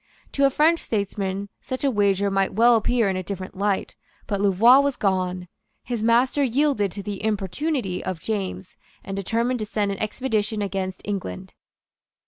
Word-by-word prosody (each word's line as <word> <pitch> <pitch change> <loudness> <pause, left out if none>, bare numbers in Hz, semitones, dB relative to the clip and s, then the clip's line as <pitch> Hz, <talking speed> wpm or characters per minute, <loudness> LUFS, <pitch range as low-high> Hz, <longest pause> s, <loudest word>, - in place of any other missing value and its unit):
To 280 - +2
a - - +5
French 315 +5 +3
statesman 200 -2 -3
such 260 +1 -5
a 275 - +3
wager 200 -2 +2
might 195 -1 0
well 235 +2 +6
appear 230 0 +2
in 190 - 0
a 185 - -2
different 185 0 -6
light. 200 0 -1 0.3
But 200 -1 -2
Louvois 210 +7 +6
was 280 -1 +1
gone. 185 -2 -1 0.4
His 235 -3 -3
master 245 +5 +3
yielded 260 -6 +1
to 200 - -6
the 205 -1 -5
importunity 215 - -2
of 185 -2 -4
James, 190 -2 -4 0.3
and 195 - -5
determined 230 +5 -1
to 215 - -2
send 205 -2 -1
an 195 - -5
expedition 215 -2 -1
against 190 -1 -4
England. 195 - -5
205 Hz, 165 wpm, -24 LUFS, 195-240 Hz, 0.4 s, well